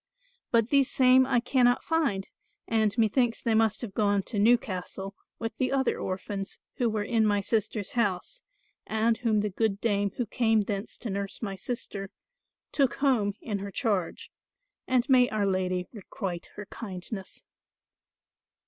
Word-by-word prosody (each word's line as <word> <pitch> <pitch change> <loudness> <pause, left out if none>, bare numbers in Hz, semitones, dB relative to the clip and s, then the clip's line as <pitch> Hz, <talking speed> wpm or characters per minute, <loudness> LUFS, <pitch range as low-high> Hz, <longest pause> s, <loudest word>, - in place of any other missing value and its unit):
But 230 -1 +3
these 275 -1 +4
same 260 0 +5
I 255 -3 +3
cannot 245 0 +3
find, 280 -13 0 0.4
and 220 -1 +1
methinks 230 +1 +2
they 230 - 0
must 220 -1 +2
have 225 -5 -6
gone 205 -1 +2
to 210 0 -3
Newcastle 200 -3 +1 0.2
with 225 -1 -4
the 255 - +1
other 265 -2 +1
orphans 195 +1 -4 0.2
who 240 -2 +2
were 215 -1 -1
in 225 +1 +2
my 205 -1 +3
sister's 210 -1 -1
house, 230 - -1 0.5
and 220 +1 +1
whom 220 -4 +2
the 210 -1 -2
good 200 0 0
dame 205 -3 +1
who 245 - 0
came 225 0 +2
thence 200 0 -4
to 230 - -5
nurse 200 +3 -4
my 195 -3 -3
sister, 195 -2 -5 0.6
took 270 -4 +2
home 235 -8 +2
in 205 -3 -3
her 200 +1 -5
charge, 200 -4 -2 0.6
and 255 -1 +2
may 255 -3 +5
our 215 -2 0
Lady 185 -1 0
requite 190 -4 -5
her 205 - -7
kindness. 190 -1 -7
215 Hz, 155 wpm, -28 LUFS, 200-240 Hz, 0.6 s, same